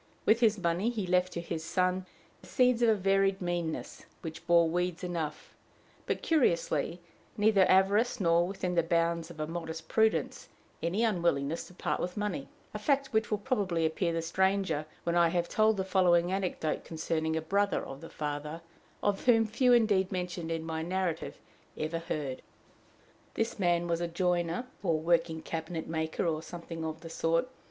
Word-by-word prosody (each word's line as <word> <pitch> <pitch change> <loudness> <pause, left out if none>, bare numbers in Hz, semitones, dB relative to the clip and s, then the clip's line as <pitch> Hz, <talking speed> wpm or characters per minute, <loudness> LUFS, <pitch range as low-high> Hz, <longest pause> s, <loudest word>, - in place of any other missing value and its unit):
With 220 +1 +5
his 220 -3 +4
money 180 +4 0
he 220 -5 -2
left 180 0 +2
to 170 - -3
his 165 -1 -4
son 185 +2 0 0.3
the - - -15
seeds 250 -2 +3
of 235 - +5
a 220 - +5
varied 195 0 +2
meanness, 175 -3 -3 0.2
which 160 -1 -7
bore 170 -1 +5
weeds 180 +1 -1
enough, 165 -4 -4 0.5
but - - -2
curiously, 170 - +1 0.4
neither 205 -2 +4
avarice 205 +6 +3
nor, 170 -2 +3
within 185 -2 -3
the 170 - +4
bounds 170 0 0
of 165 -2 -11
a 155 - -1
modest 160 0 -6
prudence, 220 +3 +1 0.3
any 185 +7 0
unwillingness 170 -7 0
to 180 - -16
part - - -2
with 180 +2 -3
money 210 +7 -3 0.2
a - - -4
fact 275 -3 +1
which 220 0 +2
will 210 - +1
probably 200 -7 0
appear 170 +2 0
the 165 0 -2
stranger 190 -3 +1 0.2
when 170 0 0
I 170 -1 +5
have 175 0 0
told 215 +2 +3
the 190 - 0
following 180 -2 +3
anecdote 185 -5 -1
concerning 160 0 -2
a - - +1
brother 200 +4 +1
of 135 +1 -9
the 165 - -9
father, 150 +2 -4 0.4
of 205 -1 0
whom 225 -2 +6
few 245 +4 +2
indeed 210 -6 +4
mentioned 180 -2 -3
in 165 -1 -2
my 160 0 -3
narrative 175 -1 -2 0.4
ever 160 +2 -2
heard. 150 -6 -4 0.9
This 225 -1 -1
man 175 -2 +2
was 170 0 0
a 175 - 0
joiner, 175 +4 0 0.2
or 165 -5 +1
working 165 0 +1
cabinet 165 0 -4
maker, 160 0 -2
or 160 -2 0
something 165 -1 -7
of 160 0 -4
the 165 - -8
sort. 165 +7 +1
175 Hz, 175 wpm, -30 LUFS, 165-195 Hz, 0.9 s, whom